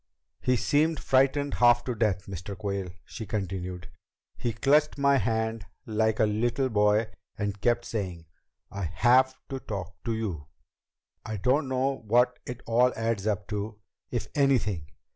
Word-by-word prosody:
"He 125 - +2
seemed 150 +5 +2
frightened 135 +2 +2
half 120 0 +5
to 125 - -2
death, 105 -5 0
Mr. 95 +1 -6
Quayle," 100 -1 -3 0.2
she 110 -4 -7
continued. 90 -3 -4 0.5
"He 120 - -2
clutched 145 +7 +3
my 140 0 +4
hand 110 -3 -1 0.2
like 110 0 +1
a - - +5
little 120 +5 0
boy 105 0 +2 0.3
and 100 -1 -3
kept 120 +1 +2
saying, 90 -7 -4 0.5
'I 100 -2 -3
have 120 +10 +4
to 135 - -4
talk 95 -6 -7
to 115 -1 0
you.' 90 -10 -4 0.8
I 110 -1 -4
don't 130 +8 +2
know 130 +1 0
what 125 +3 +3
it 125 0 -6
all 120 +2 +4
adds 115 -2 -1
up 105 -1 -1
to, 105 0 -4 0.3
if - - -2
anything. 115 - +1
110 Hz, 150 wpm, -28 LUFS, 100-125 Hz, 0.8 s, half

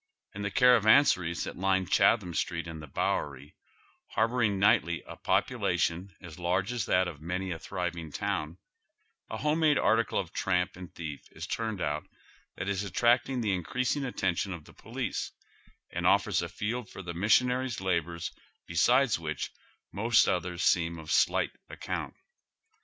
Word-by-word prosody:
In 100 - -6
tlie 100 0 -2
caravanseries 110 - +5
tliat - - -7
line 95 -1 +2
Chatliaui 95 -2 +3
Street 85 0 -1
and 80 -1 -7
the 75 - -9
Bow - - 0
ery, 70 0 -9 0.6
harboring 110 -3 +1
nigljtly 100 - +3
a - - -9
population 90 +4 0
as 85 0 -10
large 90 +5 0
as 120 -5 -2
that 90 0 +3
of 80 -4 -8
many 90 +3 -3
a 80 - -4
thriving 85 -3 -4
town, 75 +3 -3 0.7
a 110 - -4
home 150 +6 0
made 155 -3 +4
article 115 +1 +2
of 90 -4 -3
tramp 90 0 0
and 90 -1 -10
thief 75 -4 -6
is - - -6
turned 110 -4 -3
out 75 0 -2 0.5
that 95 - -5
is 100 0 -1
attracting 120 +5 +2
the 105 -4 +1
increasing 130 - -1
atten 95 -8 0
tion 90 0 -3
o£ 75 - -21
the - - -16
police, - - -4 0.6
and - - -1
offers - - +3
a - - -4
field 115 +2 -3
for 95 - -9
the 85 -1 -5
missionary's 125 +6 +2
labors 85 -3 -1 0.3
beside 120 +8 +3
which 75 -3 -4 0.4
most 115 +3 +3
others 90 -1 -1
seem 85 -1 +2
of 80 -1 -7
slight - - +3 0.2
account. - - -5
95 Hz, 160 wpm, -29 LUFS, 85-115 Hz, 0.7 s, caravanseries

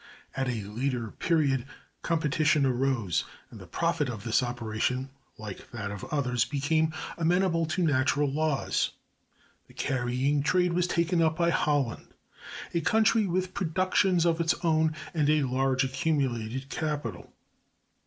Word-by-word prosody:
At 135 -1 -1
a 115 -4 -2
later 115 +2 -3
period 140 -7 +1 0.3
competition 155 -2 +2
arose, 125 - +1 0.3
and - - -11
the - - -11
profit - - 0
of 110 -4 -6
this 115 +1 +2
operation, 125 +2 -2 0.3
like 105 -3 -8
that 105 -4 -5
of 100 -1 -7
others, 125 -5 0
became 155 +4 0 0.3
amenable 170 0 +2
to 160 +3 -1
natural 145 -1 +2
laws. 150 +1 0 0.7
The - - -19
carrying 130 +2 0
trade 180 +3 +2
was 180 +1 +1
taken 170 0 +1
up 160 0 +2
by 170 -1 +2
Holland, 145 -7 0 0.7
a 170 - +1
country 220 +3 +3
with 185 +1 -1
productions 185 0 +1
of 170 -1 +2
its 165 0 +2
own 160 -1 +2 0.2
and 150 -3 +1
a 155 -1 +3
large 130 0 +1
accumulated 130 -3 -1
capital. 145 - -4
145 Hz, 135 wpm, -28 LUFS, 125-165 Hz, 0.7 s, country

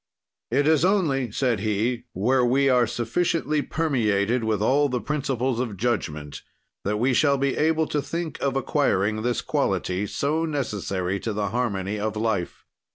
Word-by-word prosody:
"It 145 - +2
is 155 -1 +4
only," 160 - +2
said 125 -2 0
he, 110 +4 -1
"where 125 +7 +2
we 135 +3 +3
are 125 -2 +4
sufficiently 150 +6 0
permeated 120 -8 0
with 110 -2 0
all 140 +7 +3
the 125 -1 -1
principles 130 -4 -1
of 115 -6 -3
judgment 75 -10 -2 0.4
that 105 +2 -1
we 125 +4 +2
shall 140 +2 +3
be 135 0 0
able 160 +1 +2
to 150 - 0
think 165 0 -5
of 135 -1 0
acquiring 110 -6 +1
this 120 0 0
quality, 95 +3 -1
so 155 +8 -1
necessary 100 - -2
to 110 - -3
the 100 -1 -1
harmony 105 -3 -2
of 110 +1 -2
life. 110 -5 -2
125 Hz, 160 wpm, -24 LUFS, 105-140 Hz, 0.4 s, is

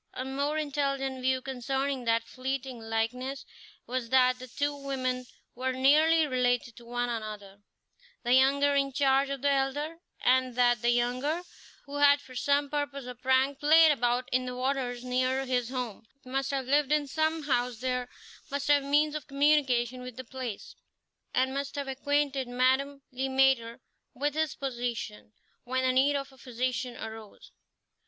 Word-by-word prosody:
A 255 - -4
more 280 +3 -1
intelligent 275 -3 -1
view 260 0 +1
concerning 265 0 -2
that 230 0 +2
fleeting 260 +1 -4
likeness 230 +5 -3 0.4
was 250 -1 -3
that 255 0 +4
the 255 - -8
two 285 +4 -2
women 255 -3 -3 0.3
were 260 +1 -2
nearly 305 +5 +4
related 245 -3 0
to 235 - -13
one 245 +1 -2
another, 210 -4 -6 0.6
the 245 0 +2
younger 280 +2 +4
in 275 -1 +1
charge 275 0 +3
of 275 -1 -4
the 285 - +3
elder; 285 +4 -1 0.2
and 255 -1 +2
that 240 -2 +3
the 240 - +2
younger, 250 +8 0 0.4
who 285 0 -6
had 285 0 +6
for 260 -2 -14
some 285 +2 +1
purpose 285 -2 -3
or 250 - -6
prank 260 +2 +1
played 315 +2 +6
about 245 -2 0
in 255 0 +1
the 250 - -4
waters 255 -1 -2
near 255 +1 0
his 250 -2 0
home, 245 -4 -5 0.2
must 270 +1 -2
have 270 -2 -2
lived 285 +2 +2
in 300 -1 +3
some 315 +2 -1
house 250 -4 0
there, 250 0 -2 0.4
must 280 0 -3
have 290 -1 +5
means 295 +2 +2
of 305 -3 -5
communication 275 -4 +2
with 250 -1 -8
the 260 - -5
place, 250 -4 -6 0.6
and 260 +1 +1
must 280 0 -3
have 285 -1 -3
acquainted 275 0 0
Madame 265 +3 +1
Le 265 +1 -2
Maître 265 -3 +2 0.4
with 290 +3 -1
his 315 -1 -1
position 240 -5 -4 0.3
when 260 +1 -1
the 255 - +3
need 270 +3 +3
of 275 0 -3
a 265 - -19
physician 250 0 -3
arose. 220 -1 -9
260 Hz, 165 wpm, -29 LUFS, 250-280 Hz, 0.6 s, had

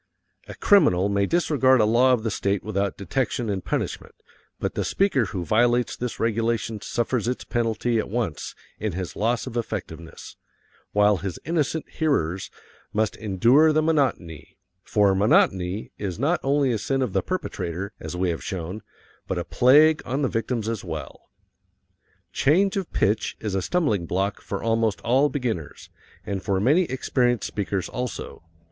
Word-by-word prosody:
A - - -8
criminal 100 - +4
may 100 0 +1
disregard 140 -7 +3
a 110 - +5
law 120 +4 +4
of 120 -3 +2
the 110 - -1
state 100 0 -1
without 100 -2 -2
detection 120 +1 -2
and 95 -2 -3
punishment, - - -3 0.4
but - - -2
the - - -1
speaker 190 - +1
who 90 -3 -4
violates 120 +5 +2
this 125 -1 -5
regulation 115 -1 -1
suffers 120 -1 -1
its 125 - -2
penalty 115 0 0
at - - -3
once 105 -8 -3 0.2
in 110 -3 -2
his 90 -3 -5
loss 115 +3 0
of 125 -3 -7
effectiveness, 85 -8 -6 0.5
while 105 0 +4
his 95 0 -5
innocent 160 -1 -1
hearers 95 - -1 0.4
must 110 0 0
endure 115 - +4
the 155 0 +2
monotony 130 - -1 0.2
for 100 +1 +2
monotony 95 -1 +2
is 95 -3 -3
not 155 +8 +1
only 140 -1 +2
a 115 - -1
sin 135 +4 0
of 115 -7 -3
the - - +2
perpetrator, 100 - -4
as 90 - -6
we 90 -1 +1
have 80 - -5
shown, 95 +2 -5 0.5
but - - -2
a - - -1
plague 150 +5 +5
on 135 +4 -2
the - - +3
victims 115 -1 -2
as 115 -1 -3
well. 75 -4 -7 1.0
Change 190 +7 +3
of 195 -3 -3
pitch 105 +3 0
is 105 -3 -4
a 95 - 0
stumbling 110 - 0
block 95 +4 -1
for 100 - -5
almost 115 -2 +1
all 135 +5 +3
beginners, 115 - -4 0.3
and 100 -1 -3
for 95 -2 0
many 150 - +3
experienced 125 -3 0
speakers 100 -2 -2
also. 125 -1 -5
115 Hz, 160 wpm, -24 LUFS, 100-130 Hz, 1.0 s, a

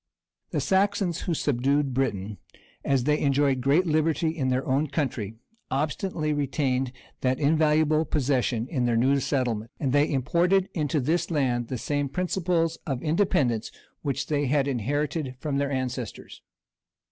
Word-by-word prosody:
The - - -1
Saxons 190 -3 +1
who 170 - -1
subdued 140 0 +1
Britain, 105 -7 -2 0.4
as 135 -3 +1
they 150 +3 +2
enjoyed 140 -2 +2
great 145 +8 +3
liberty 155 0 +1
in 135 -5 0
their 130 +1 0
own 140 +3 +1
country, 115 -8 -2 0.3
obstinately 155 +3 -1
retained 135 -3 0 0.3
that 130 0 0
invaluable 155 +1 +3
possession 130 -5 0
in 130 -5 -1
their 120 -1 +2
new 135 +4 +3
settlement; 120 -5 -1
and 135 -3 0
they 145 +1 +3
imported 175 +8 +2
into 150 -2 0
this 165 +6 0
island 125 -6 0
the 130 - -3
same 145 +3 -1
principles 170 0 0
of 135 -4 -1
independence 155 - +1 0.3
which 140 -2 -2
they 145 -2 0
had 140 +1 +2
inherited 140 +2 -1
from 145 -1 -2
their 140 0 0
ancestors. 130 -4 -4
140 Hz, 145 wpm, -26 LUFS, 130-155 Hz, 0.4 s, great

